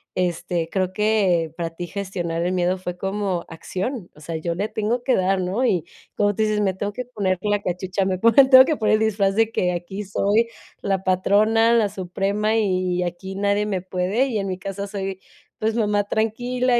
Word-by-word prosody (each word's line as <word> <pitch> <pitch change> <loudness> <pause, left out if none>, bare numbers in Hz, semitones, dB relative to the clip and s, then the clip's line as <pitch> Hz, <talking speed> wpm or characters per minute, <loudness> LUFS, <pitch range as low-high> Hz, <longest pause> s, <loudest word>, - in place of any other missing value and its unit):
este, 175 -2 -1
creo 185 0 -1
que 195 -7 +2
para 165 -1 -3
ti 175 +1 -6
gestionar 175 -3 -3
el 180 - 0
miedo 180 0 +1
fue 180 -1 -6
como 195 -2 -2
acción, 190 - -5
o 150 - -16
sea, 160 +1 -4
"Yo 170 +1 -3
le 205 +5 -2
tengo 225 +3 -1
que 255 0 +2
dar", 190 +1 +1
¿no? 190 +8 0
Y 180 -9 +1 0.3
como 205 0 +2
tú 220 - 0
dices: 215 -1 +1
"Me 190 -2 +1
tengo 205 +2 -4
que 250 - -4
poner 200 -7 -1
la 205 0 0
cachucha", 185 +1 -2
me 190 -1 0
ponen, 230 +7 +5
tengo 260 -1 +10
que 305 +2 -1
poner 215 - +2
el 215 - +4
disfraz 200 -3 +1
de 225 0 +2
que: 180 -4 0
"Aquí 190 +4 -5
soy 205 +4 +1 0.3
la 195 -1 -1
patrona, 215 +5 +3
la 220 -3 +3
suprema 200 +3 -1
y 185 -4 +1
aquí 180 +2 -5
nadie 200 +1 +1
me 195 -3 -2
puede", 190 +7 0
y 230 -5 -2
en 195 - -2
mi 185 -1 -3
casa 195 +1 -5
soy, 195 -1 -4 0.4
pues, 220 +1 0
mamá 205 -3 +1
tranquila 245 +4 0
195 Hz, 205 wpm, -22 LUFS, 185-215 Hz, 0.4 s, tengo